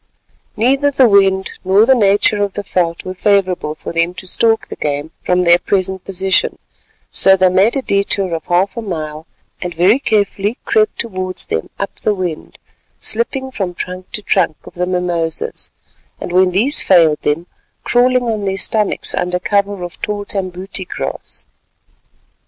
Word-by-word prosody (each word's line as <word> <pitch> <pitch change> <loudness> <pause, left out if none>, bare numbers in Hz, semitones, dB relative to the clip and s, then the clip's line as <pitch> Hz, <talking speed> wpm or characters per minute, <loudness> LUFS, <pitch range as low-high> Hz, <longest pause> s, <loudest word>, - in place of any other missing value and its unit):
Neither 270 +6 +2
the 265 -3 +4
wind 195 -2 +3
nor 195 +3 +4
the 265 - +5
nature 205 -2 +3
of 200 -2 -1
the 205 - -4
veldt 170 -3 -1
were 185 - -4
favourable 185 -5 0
for 155 - -8
them 165 +2 0
to 185 - -6
stalk 225 +4 +2
the - - -7
game 145 +1 -3
from 180 0 +1
their 170 0 +5
present 190 -1 -1
position, 190 0 +1 0.5
so 190 0 +6
they 185 0 +4
made 190 +7 +3
a 270 - -1
detour 200 -3 +1
of 160 -1 -4
half 180 +3 +1
a 235 - -4
mile 155 -5 -6 0.3
and 175 -1 -5
very 190 +9 +4
carefully 205 -2 0
crept 215 0 +1
towards 185 -5 -2
them 80 - -3
up 200 -1 -5
the 210 - 0
wind, 180 -5 -5 0.4
slipping 265 +4 0
from 190 -7 -4
trunk 185 +1 -7
to 210 - -4
trunk 175 -6 +1
of - - -12
the 180 0 -2
mimosas 175 -3 -2 0.5
and - - -6
when 185 +1 +4
these 225 +11 +2
failed 165 -5 +4
them, 150 +4 -1 0.4
crawling 250 +1 +2
on 220 -4 -2
their 195 0 -1
stomachs 210 +3 0
under 180 0 -1
cover 200 0 -1
of 175 -2 -8
the - - -5
tall 205 -1 -3
tambuti 190 -1 -2
grass. - - -6
190 Hz, 170 wpm, -16 LUFS, 180-210 Hz, 0.5 s, so